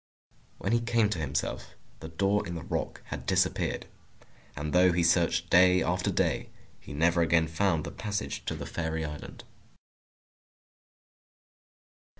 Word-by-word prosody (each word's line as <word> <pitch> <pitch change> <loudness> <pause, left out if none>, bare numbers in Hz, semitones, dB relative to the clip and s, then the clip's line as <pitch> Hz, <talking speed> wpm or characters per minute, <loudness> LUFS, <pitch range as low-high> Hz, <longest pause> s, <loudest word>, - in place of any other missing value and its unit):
When 100 - -2
he 120 - +4
came 115 -2 +1
to 90 - -2
himself, 70 -2 -3 0.2
the 80 - -8
door 100 +5 0
in 85 - -5
the 80 - -6
rock - - -4
had - - -7
disappeared. - - +1 0.7
And 75 +1 -4
though 90 +1 +5
he 85 0 +1
searched 85 0 +2
day 90 +1 +6
after 90 +1 0
day, - - 0 0.3
he - - -12
never 85 +4 +2
again 85 -1 +3
found 80 -1 +1
the 75 - -6
passage 105 +9 -4
to - - -2
the - - -6
Fairy 80 -1 -3
Island. 75 -1 -8
85 Hz, 145 wpm, -29 LUFS, 80-95 Hz, 0.7 s, day